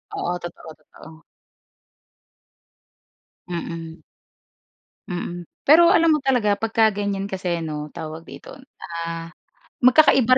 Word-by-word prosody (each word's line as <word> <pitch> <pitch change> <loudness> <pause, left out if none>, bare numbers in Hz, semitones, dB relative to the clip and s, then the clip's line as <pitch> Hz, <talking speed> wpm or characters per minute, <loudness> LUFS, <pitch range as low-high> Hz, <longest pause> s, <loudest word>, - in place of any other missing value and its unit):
Oo, 175 0 -2
totoo, 170 -2 -9
totoo. 160 +1 -16 2.3
Mm. 165 -1 -6 1.1
Mm. 175 -1 -5 0.2
Pero 335 +4 +7
alam 330 -1 +4
mo 305 - +3
talaga 245 -7 +1
pagka 225 0 +3
ganiyan 200 -1 -3
kasi 180 -3 -2
'no 150 -1 -5
tawag 160 +1 -7
dito, - - -11 0.5
ah, 165 0 -5 0.5
magkakaiba 255 -1 +6
180 Hz, 100 wpm, -22 LUFS, 165-240 Hz, 2.3 s, Pero